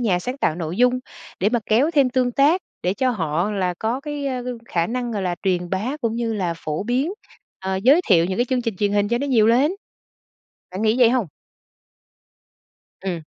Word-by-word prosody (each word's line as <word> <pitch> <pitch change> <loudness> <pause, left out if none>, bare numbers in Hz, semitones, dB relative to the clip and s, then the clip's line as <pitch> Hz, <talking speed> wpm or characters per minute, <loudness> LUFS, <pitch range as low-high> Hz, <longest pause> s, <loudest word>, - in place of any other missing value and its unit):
nhà 200 -7 +2
sáng 250 +9 -5
tạo 155 - +1
nội 165 0 -4
dung 250 +2 +3 0.4
để 195 - +3
mà 240 - +1
kéo 245 +9 +3
thêm 280 -6 +3
tương 250 -1 +1
tác, 305 +8 +3 0.2
để 185 +2 0
cho 260 +1 +1
họ 170 -2 -1
là 185 -3 -1
có 230 +4 -1
cái, 290 -1 -4
a, 255 -2 -2 0.3
khả 170 -1 0
năng, 245 0 -3
gọi 200 -2 -2
là, 180 -1 -1
truyền 180 -2 0
bá 220 +10 -2
cũng 230 -2 -1
như 235 -1 -1
là 180 -5 -1
phổ 155 +1 -4
biến, 260 - 0 0.5
ờ, 190 0 -2
giới 260 - +5
thiệu 170 -4 +5
những 185 +1 -2
cái 245 - +3
chương 255 -1 -1
trình 230 -5 -3
truyền 205 +1 0
hình 205 0 +2
cho 235 - +1
nó 280 - -2
nhiều 230 -6 +4
lên? 255 +7 +4 1.0
Bạn 190 +4 -4
nghĩ 220 +3 +2
vậy 240 -2 +6
hông? 245 -5 +1 1.8
Ừm. 180 -4 -3
225 Hz, 210 wpm, -22 LUFS, 190-255 Hz, 1.8 s, vậy